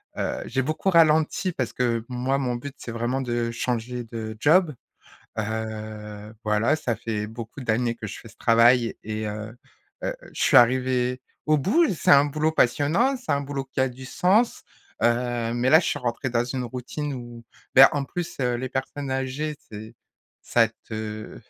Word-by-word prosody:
heu, - - -2
j'ai 130 - -1
beaucoup 155 +8 -1
ralenti 160 +2 +3
parce 130 -6 -3
que 115 -2 0
moi 125 +2 -1
mon 130 -3 -1
but 135 +3 -7
c'est 120 - -7
vraiment 120 +3 -1
de 120 -2 -1
changer 120 +1 -3
de 110 -1 -6
job. 160 +2 +4 0.6
Heu, 110 -1 -5
voilà 105 +6 +2
ça 125 -7 -2
fait 105 -1 -3
beaucoup 115 +4 -8
d'années 120 0 0
que 110 - -6
je - - -8
fais 115 - -13
ce 110 - -19
travail 115 +1 +4
et 110 0 -4
heu 110 +2 -6 0.5
heu, - - -1 0.2
je - - -3
suis - - +5
arrivée 125 +1 +3 0.3
au 155 0 +4
bout, 300 - +3
c'est 170 - 0
un 140 0 +7
boulot 155 +2 0
passionnant, 160 - +2
c'est 250 0 -3
un 140 - +1
boulot 140 -1 -4
qui 130 0 -4
a 130 - +3
du 130 +1 -11
sens. 195 - +2 0.4
Heu, 120 -1 +1
mais 120 +2 +1
là 160 - +8
je - - -3
suis - - -1
rentré 125 0 -2
dans 120 0 +1
une 125 +1 -3
routine 130 +4 -5
où, 120 -2 -9 0.3
bah, 135 +1 +10
en 145 -1 -1
plus, 175 +5 -5
heu, 125 -1 +1
les 130 +2 -4
personnes 135 +2 -4
âgées 135 +3 -2
c'est 110 +2 -9 0.5
ça 115 -2 +3 0.2
te 110 -1 -6
125 Hz, 180 wpm, -25 LUFS, 115-140 Hz, 0.6 s, bah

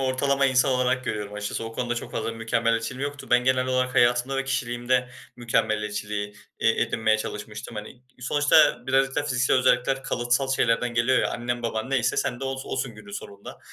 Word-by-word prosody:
ortalama 135 +1 +1
insan 130 +1 +3
olarak 130 0 +1
görüyorum 105 -3 -4
açıkçası. 105 +2 -4
O 115 - -6
konuda 120 +1 -2
çok 120 - -6
fazla - - -2
bir - - -10
mükemmeliyetçiliğim 115 +2 -1
yoktu. 145 0 -11
Ben 125 0 +4
genel 130 0 +2
olarak 130 0 0
hayatımda 120 +2 +3
ve 135 - -1
kişiliğimde 125 -1 0 0.3
mükemmeliyetçiliği, 105 -3 -1 0.3
eee, 115 - +3
edinmeye 110 -2 +1
çalışmıştım, 105 +1 -6
hani. 110 +4 -8 0.2
Sonuçta 145 +4 +3
birazcık 135 +1 +2
da 145 - +2
fiziksel 130 -2 +1
özellikler 130 +1 +2
kalıtsal 125 +2 0
şeylerden 120 -1 +1
geliyor 120 +2 +3
ya. - - +1
Annen 120 0 -3
baban 115 +2 -3
neyse 125 -2 +1
sen 120 +1 -1
de - - -3
os 135 0 -4
osun 130 -4 -3
günün 105 -1 -13
sonunda. 100 0 -9
125 Hz, 180 wpm, -25 LUFS, 115-130 Hz, 0.3 s, Ben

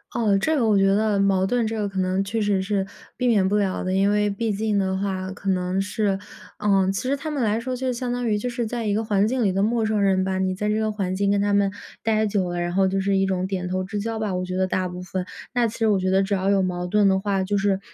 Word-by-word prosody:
哦， 210 -4 +2
这 315 +11 +1
个 255 -6 +2
我 210 -2 +4
觉 195 - +4
得， 205 +1 +2
矛 195 -1 +2
盾 235 +3 +1
这 225 0 -3
个 205 -1 -1
可 195 -1 -4
能 185 +1 +1
确 210 +3 -2
实 205 -2 +1
是 195 0 -1 0.3
避 250 - 0
免 205 -5 +3
不 210 - +2
了 195 -2 0
的， 185 - -2
因 195 +1 +3
为 210 0 +2
毕 215 +2 -2
竟 210 +1 0
的 190 -1 0
话 190 -1 -3
可 200 0 -5
能 185 +1 0
是 205 -1 -1 0.4
嗯， 195 -2 +2
其 195 - -2
实 270 +2 -1
他 310 +3 -5
们 285 -4 -1
来 215 0 +1
说 255 +2 -3
就 255 +1 -1
相 245 0 -3
当 245 0 -2
于 210 -2 +2
就 245 +4 -3
是 240 -1 -2
在 230 0 -3
一 205 - +1
个 220 +2 0
环 205 -2 +2
境 250 +1 0
里 200 - +2
的 195 +1 0
陌 225 +1 +1
生 215 -1 +1
人 190 -1 +3
吧， 190 0 -1
你 190 0 0
在 210 +2 -2
这 210 - +1
个 220 0 0
环 195 -3 -2
境 200 +1 +1
跟 200 0 +2
他 205 0 +1
们 200 -1 +3 0.3
待 220 -1 +2
久 195 -3 0
了， 175 0 -2
然 175 0 -2
后 190 0 +3
就 195 +1 0
是 195 0 +1
一 195 - +2
种 185 -1 -1
点 185 -2 -3
头 185 +1 -1
之 205 +2 -4
交 225 +2 -3
吧， 210 -3 -2
我 180 0 -2
觉 185 0 -4
得 190 0 +2
大 185 0 -1
部 180 0 -7
分。 185 0 -4 0.3
那 245 -2 +2
其 220 - -7
实 225 - +2
我 200 -3 +3
觉 185 0 0
得 195 +1 +3
只 200 +1 -2
要 195 0 +1
有 195 -1 +3
矛 180 -1 -2
盾 210 +1 +3
的 190 - +2
话， 195 -1 0
就 200 +2 0
是， 195 -1 +1
200 Hz, 325 characters per minute, -23 LUFS, 190-215 Hz, 0.4 s, 我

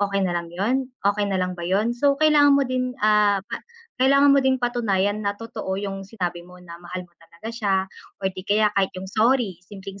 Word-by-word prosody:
okey 200 -1 0
na 175 - -1
lang 170 -1 -4
'yon, 250 +9 -1 0.2
okey 205 0 +1
na 195 - 0
lang 185 0 -1
ba 170 - -6
yun? 210 +5 +1
So, 280 +2 +2
kailangan 290 -2 +5
mo 280 - +2
din, 255 0 -2
ah, 210 -2 +4
pa - - -6 0.4
kailangan 275 +2 +5
mo 280 - +5
din 265 -1 +2
patunayan 215 -5 0
na 200 -1 -2
totoo 205 -4 -5
yung 195 -1 -5
sinabi 180 -5 -4
mo 180 +1 -15
na 170 -1 -11
mahal 180 +1 -7
mo 175 - -24
talaga 170 +6 -11
siya 210 -4 0 0.5
or 190 -1 -1
'di 185 0 -9
kaya 210 +1 +4
kahit 195 -1 +3
yung 185 - -6
sorry, 220 -4 +1
simpleng 195 0 -10
205 Hz, 215 wpm, -23 LUFS, 190-245 Hz, 0.5 s, kailangan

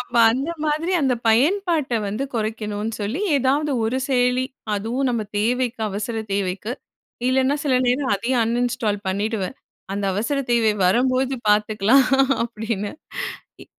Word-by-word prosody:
அப்ப 240 - -5 0.2
அந்த 270 +7 -2
மாதிரி 310 +4 0
அந்த 265 -3 +2
பயன்பாட்ட 310 - +2
வந்து 215 +7 -2
குறைக்கனுன்னு 215 -1 -2
சொல்லி 215 - -2 0.2
எதாவது 280 +3 +1
ஒரு 235 +4 0
செயலி, 250 -1 +2 0.3
அதுவும் 235 +6 -1
நம்ம 235 -2 -1 0.2
தேவைக்கு, 245 +2 0
அவசர 215 +3 -3
தேவைக்கு! 200 +3 -2 0.6
இல்லன்னா 265 +2 +2
சில 275 -3 +2
நேரம் 255 0 +1
அதையும் 240 +4 +1
அன்இன்ஸ்டால் 230 -3 -1
பண்ணிடுவேன். 205 +3 -2 0.4
அந்த 200 0 -2
அவசர 230 +9 -1
தேவை 225 -2 +3
வரும்போது 255 +6 +2 0.2
பார்த்துக்கலாம் 215 +5 +4 0.4
அப்பிடின்னு 220 -3 -3 0.7
இ - - -22
235 Hz, 125 wpm, -22 LUFS, 210-265 Hz, 0.7 s, பார்த்துக்கலாம்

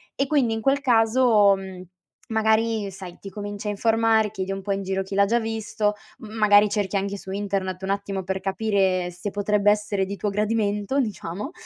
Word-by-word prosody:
E 275 - 0
quindi 265 -6 +2
in 225 - -2
quel 275 +3 +2
caso, 225 -4 +4
mhmm, 190 -1 -8 0.5
magari 220 -1 +1
sai, 185 -2 -10
ti 200 - -9
cominci 205 +1 -6
a 210 - 0
informare, 225 0 +2
chiedi 195 -2 -4
un 195 - -5
po' 200 +1 -4
in 195 0 -1
giro 195 0 -2
chi 195 +1 -7
l'ha 200 0 +5
già 230 +4 +2
visto, 220 -2 -2 0.2
m 220 - -10
magari 210 -1 +5
cerchi 205 -1 -2
anche 200 +1 -1
su 190 - -11
internet 195 -2 -3
un 190 - -3
attimo 195 -1 -2
per 190 +1 -3
capire 190 -2 0
se 175 +4 -6
potrebbe 205 0 +1
essere 205 -2 +1
di 200 +1 -5
tuo 205 - -2
gradimento, 210 +4 0
diciamo, 210 - -5
205 Hz, 195 wpm, -24 LUFS, 195-220 Hz, 0.5 s, l'ha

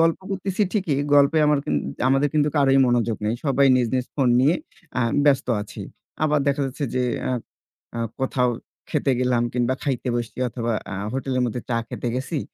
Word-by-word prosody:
গল্প 165 0 +3
করতেছি 195 +1 -1
ঠিকই, 175 -10 0 0.2
গল্পে 145 +3 +5
আমার 150 -1 +3
কিন - - -1 0.3
আমাদের 135 +2 +3
কিন্তু 150 0 +3
কারোই 135 -1 +4
মনোযোগ 120 -2 +1
নাই, 110 +2 +1
সবাই 140 -1 +3
নিজ, 125 - +2
নিজ 130 -1 0
phone 130 -4 +2
নিয়ে, 150 +6 +4 0.4
আ - - +1 0.2
ব্যস্ত 135 -2 +3 0.2
আছি। 105 - -9 0.4
আবার 150 -1 +3
দেখা 140 +1 +1
যাচ্ছে 140 +2 -4
যে 125 - +2 0.2
অ্যা 130 - -1 0.6
আ - - -1 0.2
কোথাও 125 -1 +1 0.4
খেতে 135 - +1
গেলাম 125 -2 +2
কিংবা 125 +1 +1
খাইতে 130 -2 -2
বসছি 120 +1 -5
অথবা 115 0 -2 0.2
আ - - -3 0.2
hotel-এর 130 -1 -1
মধ্যে 120 +1 -3
চা 115 - +1
খেতে 120 - -4
গেছি। 135 +5 -2
135 Hz, 180 wpm, -23 LUFS, 125-145 Hz, 0.6 s, গল্পে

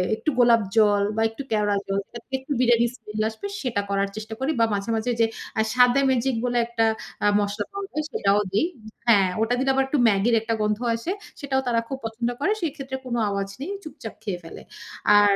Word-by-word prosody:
একটু 305 - -1
গোলাপ 235 -2 +6
জল 205 -2 +5
বা 225 - 0
একটু 250 +5 -7
কেওড়া 205 -1 +2
জল, 195 0 0
যাতে 235 +3 -11
একটু 270 +3 -11
বিরিয়ানির 235 -1 +4
স্মেল 215 -2 -5
আসবে 225 - -7
সেটা 235 -6 -1
করার 200 0 +1
চেষ্টা 215 +1 -6
করি 270 +4 0
বা 230 - +5
মাঝে, 200 +2 -2
মাঝে 225 +3 0
যে - - +6 0.3
আ - - +5
স্বাদে 250 +2 +5
ম্যাজিক 255 0 +1
বলে 245 0 0
একটা 230 -1 +1 0.4
আ - - +5
মসলা 205 0 -2
পাওয়া 400 0 -4
যায় 305 0 -1
সেটাও 200 0 +2
দেই। 210 - +3 0.4
হ্যাঁ, 200 -5 +5
ওটা 230 +2 +2
দিলে 270 +1 +1
আবার 270 0 +3
একটু 280 0 0
ম্যাগির 220 +3 +3
একটা 230 0 -1
গন্ধ 210 +1 +1 0.2
আছে। 230 +11 -3 0.3
সেটাও 265 -2 0
তারা 230 -1 +2
খুব 270 - -4
পছন্দ 230 +2 -2
করে। 410 - +1
সেক্ষেত্রে 275 -4 -3
কোন 240 -1 -2
আওয়াজ 200 0 -2
নেই। 360 +8 -4
চুপচাপ 230 -8 -8
খেয়ে 180 -4 -3
ফেলে। 165 - -10 0.6
আর 205 -1 +5
230 Hz, 205 wpm, -24 LUFS, 210-265 Hz, 0.6 s, গোলাপ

